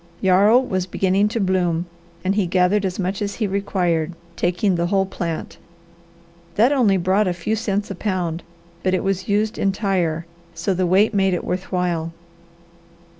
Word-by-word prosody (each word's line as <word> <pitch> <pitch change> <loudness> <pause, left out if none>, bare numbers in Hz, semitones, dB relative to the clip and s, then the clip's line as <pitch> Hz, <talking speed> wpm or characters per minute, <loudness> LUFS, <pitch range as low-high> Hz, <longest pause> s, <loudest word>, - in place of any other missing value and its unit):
Yarrow 195 +5 +5
was 190 -8 -1
beginning 190 +3 +2
to 225 +2 -2
bloom 180 -3 +1 0.4
and 190 - +2
he 200 -3 +1
gathered 185 +3 +2
as 185 -1 -2
much 195 +2 -2
as 205 0 -2
he 220 - -1
required, 180 -4 0 0.2
taking 180 +4 +1
the 170 0 0
whole 195 +1 +2
plant. 170 -4 -5 1.0
That 230 +6 +4
only 235 -9 +3
brought 190 +3 +2
a 180 - +1
few 175 +5 -2
cents 205 -2 -2
a - - -4
pound, 180 -4 -2 0.4
but 185 +1 +1
it - - -1
was 195 -1 -2
used 210 +2 0
entire, 190 -5 0 0.3
so 175 +4 -1
the 185 0 0
weight 195 +5 +3
made 195 -2 +2
it - - -4
worth 185 +1 -3
while. 170 -3 -1
190 Hz, 170 wpm, -21 LUFS, 180-200 Hz, 1.0 s, Yarrow